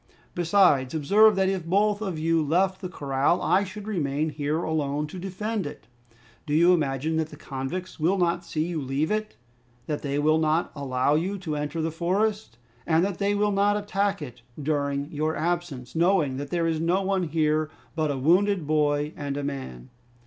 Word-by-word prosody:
"Besides, 170 -7 +3
observe 205 +8 +5
that 190 0 +2
if 190 -2 -1
both 205 +4 +1
of 190 -6 -3
you 165 +1 +2
left 185 +5 +1
the 185 - -4
corral 140 +1 0
I 195 - +2
should 200 +1 -8
remain 155 -6 -1
here 150 +3 -2
alone 150 -2 -1
to 180 +5 -8
defend 195 +1 -3
it. 145 - -10 0.6
Do 145 - 0
you 170 +3 +6
imagine 155 0 0
that 160 -1 -1
the 150 - -10
convicts 145 +7 -6
will 175 +6 +2
not 175 -1 +1
see 155 -2 -2
you 170 -3 -3
leave 140 +5 -1
it, 215 0 -2 0.5
that 150 -2 -3
they 140 -1 -2
will 155 +2 +3
not 160 +2 +1
allow 135 -1 0
you 180 +6 0
to 165 -5 -4
enter 150 +2 -3
the 160 - -1
forest, 190 - -1 0.3
and 165 +2 +3
that 195 -3 -4
they 200 0 +1
will 210 0 +2
not 205 +1 +2
attack 200 -3 -1
it 125 -4 -10 0.2
during 140 0 -1
your 155 +1 -1
absence, 165 -6 -3
knowing 165 -6 +2
that 140 +1 -5
there 170 -1 0
is 165 -1 0
no 175 +4 +1
one 190 -2 0
here 155 0 +1 0.3
but 155 -2 0
a 140 - -1
wounded 180 +5 +3
boy 150 0 +1
and 140 -1 -4
a 145 - -3
man?" 130 - -6
160 Hz, 190 wpm, -26 LUFS, 145-190 Hz, 0.6 s, you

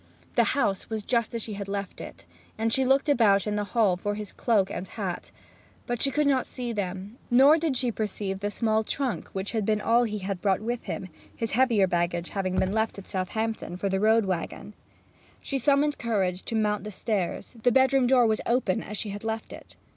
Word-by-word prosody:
The - - +4
house 200 -9 0
was 220 -2 -3
just 235 0 0
as 230 - -3
she 215 - -5
had 200 0 -5
left 200 -1 -4
it, - - -10 0.3
and 225 +1 0
she 265 - +3
looked 270 +3 +3
about 215 -9 +4
in 210 -1 -1
the 210 - 0
hall 210 -6 +4
for 205 +3 -3
his 210 -1 -6
cloak 200 -5 +1
and 190 - -5
hat, 190 -5 -5 0.6
but 240 -2 -3
she 275 - +3
could 295 +3 +1
not 270 -2 +2
see 245 -2 -4
them; 195 +2 -5
nor 270 +5 +7
did 310 -5 0
she 245 -1 +1
perceive 205 -3 -3
the 205 +1 -2
small 220 0 +1
trunk 265 +1 -2
which 190 +1 -4
had 220 -2 -1
been 215 +1 +1
all 230 +3 +3
that - - -3
he 200 -2 -3
brought 190 0 0
with 235 +2 -4
him, 185 - -5 0.3
his 225 -2 -3
heavier 235 -5 +4
baggage 175 -1 -1
having 185 -2 -2
been 190 +1 +1
left 220 0 0
at 195 - -9
Southampton 220 0 -3
for 195 +2 -1
the 190 0 0
road 220 +1 +4
waggon. 190 +3 -4 0.7
She 275 - -2
summoned 290 +2 +2
courage 195 -6 0
to 230 - -3
mount 210 -2 +1
the 210 - -5
stairs; 205 0 -3
the 245 - +4
bedroom 265 +1 +4
door 250 -1 +5
was 220 -1 +1
open 235 -6 +1
as 210 - -5
she 210 - -3
had 205 +1 -6
left 225 0 -4
it. - - -10
215 Hz, 215 wpm, -27 LUFS, 195-240 Hz, 0.7 s, nor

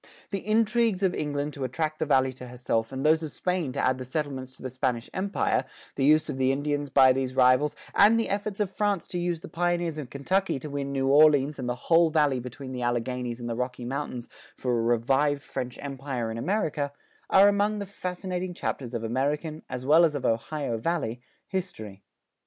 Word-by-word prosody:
The 200 - -1
intrigues 220 -1 +1
of 185 -2 +3
England 145 0 -2
to 140 - -5
attract 155 +5 -2
the 155 - -1
Valley 130 -2 +3
to 125 0 -10
herself 120 -2 -2
and 135 +1 -4
those 160 +1 +4
of 160 - -4
Spain 180 -5 -1
to - - -3
add 130 0 +1
the - - -4
settlements 130 -1 -4
to - - -14
the 130 - -3
Spanish 125 -2 -2
Empire, 195 +2 0 0.3
the - - -2
use 155 +3 +5
of 135 - -4
the 130 0 +3
Indians 145 +1 -1
by 130 -1 +6
these 130 -1 -2
rivals, 130 +3 +4 0.2
and 215 +3 +6
the 225 - 0
efforts 205 0 -2
of 205 -3 0
France 205 -2 0
to 180 - -3
use 175 -2 -1
the - - -8
pioneers 175 -1 -1
of 135 -5 -6
Kentucky 185 +7 0
to 145 +2 -7
win 140 -1 -3
New 135 -1 0
Orleans 145 0 +5
and 125 -1 -3
the 125 - -1
whole 165 +6 +3
Valley 150 -4 +2
between 125 +2 -8
the 125 -1 -4
Alleghanies 120 0 -2
and 120 - -5
the 115 - -2
Rocky 125 0 -3
Mountains 125 -2 -4 0.3
for 125 - -2
a 120 -1 +1
revived 135 +5 +2
French 125 -1 -5
Empire 135 -4 -4
in 110 - -5
America, 150 - -1 0.4
are 195 +1 +7
among 205 +1 +2
the 200 - -4
fascinating 180 -1 -4
chapters 125 -7 -4
of 115 - -3
American, 145 +7 -1
as 125 0 -5
well 155 +5 +6
as 155 -3 +3
of 145 - -3
Ohio 115 +1 -1
Valley, 125 -6 -2 0.3
history. 170 - -5
145 Hz, 205 wpm, -27 LUFS, 125-175 Hz, 0.4 s, are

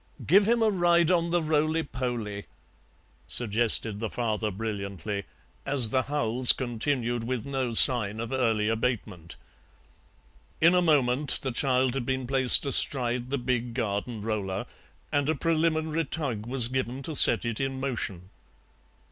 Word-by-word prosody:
"Give 200 +5 +4
him 235 -1 +2
a 220 - +3
ride 175 -2 +2
on 170 -1 +1
the 175 -1 0
roly 155 +1 0
poly," 120 -7 -5 0.8
suggested 110 -2 +2
the 110 -1 -4
father 110 -2 -3
brilliantly, 100 -2 -6 0.4
as 130 -5 +3
the 130 +3 +1
howls 125 -3 +1
continued 120 -1 -3
with 120 -1 -4
no 130 -4 -3
sign 110 -4 +4
of 115 +1 -6
early 115 -5 0
abatement. 110 -7 -4 1.2
In 165 +2 +4
a 180 - +3
moment 145 -4 +1
the 135 - -3
child 130 0 0
had 135 -2 -4
been 130 -1 -2
placed 130 +1 +5
astride 125 -3 +4
the 140 - -2
big 120 -2 -3
garden 110 -1 -4
roller 100 -3 -4 0.5
and 145 0 0
a 160 - +1
preliminary 160 0 -1
tug 125 -7 -4
was 125 -2 -2
given 130 +1 -4
to 155 +2 -5
set - - +5
it 115 -2 -4
in 135 -1 -3
motion. 105 -9 -5
125 Hz, 145 wpm, -26 LUFS, 115-145 Hz, 1.2 s, placed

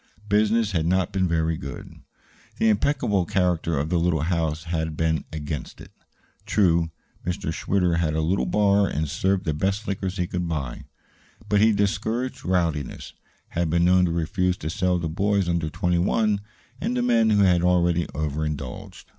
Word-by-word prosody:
Business 105 +1 +2
had 80 -3 0
not 95 -1 +1
been 95 -1 +1
very 80 -1 +1
good. 70 -3 -9 0.6
The 110 - +3
impeccable 105 -3 +1
character 85 -4 0
of 75 +3 -1
the 90 -1 +2
little 85 -3 +1
house 80 -2 -1
had 80 -2 -3
been 80 -2 0
against 75 -3 -5
it. - - -12 0.6
True, 85 -5 +3 0.3
Mr. 85 -2 -3
Schwitter 90 -1 +1
had 80 -2 0
a 80 - +1
little 90 +5 0
bar 100 -1 +3
and 75 +2 -2
served 95 +5 0
the 80 - 0
best 95 +7 -1
liquors 95 -1 -3
he 90 - 0
could 90 -1 -3
buy; 70 -7 -4 0.6
but 105 -1 +3
he 110 +1 +6
discouraged 110 +5 -1
rowdiness 85 -7 -1 0.4
had 85 -1 -1
been 85 +2 +2
known 90 0 +5
to 85 - -1
refuse 90 +2 0
to 80 - -4
sell 90 +1 +1
to 85 - -2
boys 100 +3 0
under 85 -2 0
twenty 90 +3 0
one 105 +2 +1 0.4
and 125 - -1
to 125 - 0
men 115 -2 +3
who 105 -2 +4
had 90 -2 +4
already 85 -1 +2
overindulged. 75 -3 -4
90 Hz, 170 wpm, -24 LUFS, 80-100 Hz, 0.6 s, he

